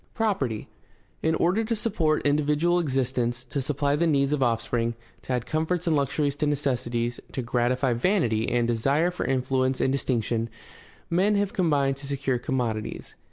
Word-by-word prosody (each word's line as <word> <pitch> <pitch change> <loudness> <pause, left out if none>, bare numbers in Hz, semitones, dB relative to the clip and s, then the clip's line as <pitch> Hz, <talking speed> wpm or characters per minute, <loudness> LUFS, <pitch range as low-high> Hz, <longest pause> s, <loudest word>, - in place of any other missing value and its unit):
Property. 140 - -1 0.3
— - - -37
In 160 - +2
order 180 +7 +2
to 230 +1 -1
support 180 -9 0
individual 150 +4 +2
existence, 130 -5 -1
to 135 +2 -3
supply 145 +1 0
the 170 +3 +2
needs 140 -2 +2
of 145 - 0
offspring, 115 -1 0 0.3
to - - -7
add 125 -1 -1
comforts 160 +3 -1
and 165 -2 +2
luxuries 140 0 0
to 150 0 0
necessities, 120 -4 -1
to 130 - -2
gratify 125 +2 +1
vanity 120 - +1
and 120 -1 +1
desire 140 +9 +2
for 180 - -3
influence 130 0 +1
and 130 - +2
distinction, 115 -4 -1 0.6
men 195 +5 +3
have 200 -1 0
combined 140 -6 +2
to 140 0 -9
secure 135 -2 -1
commodities. 120 -4 -3
140 Hz, 160 wpm, -26 LUFS, 120-155 Hz, 0.6 s, men